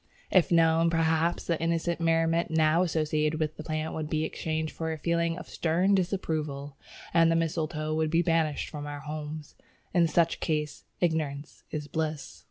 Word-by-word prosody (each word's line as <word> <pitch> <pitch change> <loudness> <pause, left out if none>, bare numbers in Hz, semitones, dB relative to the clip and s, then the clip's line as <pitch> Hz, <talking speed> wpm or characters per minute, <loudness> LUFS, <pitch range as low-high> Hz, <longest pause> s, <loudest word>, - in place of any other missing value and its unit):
If 185 -2 +4
known, 165 0 +4
perhaps, 165 0 +1
the 170 -2 -1
innocent 170 +1 0
merriment 165 0 +2
now 160 +1 +3
associated 155 -2 0
with 155 0 -1
the 155 - -8
plant 155 0 -3
would 155 -1 -4
be 155 0 0
exchanged 160 0 -3
for 160 0 -3
a 160 - -3
feeling 170 +1 0
of - - -8
stern 175 +4 +1
disapproval, 155 -7 -1 0.4
and 165 -1 +5
the - - +3
mistletoe 155 -1 -1
would 155 0 +1
be 165 +2 +3
banished 165 -3 +1
from 145 -1 -6
our 145 -1 -6
homes. 150 0 -6 0.4
In 170 -2 +4
such 165 +1 +2
a - - -30
case 150 -2 -2 0.2
ignorance 155 -4 -2
is 150 -2 -4
bliss." 155 0 -3
160 Hz, 175 wpm, -28 LUFS, 155-165 Hz, 0.4 s, and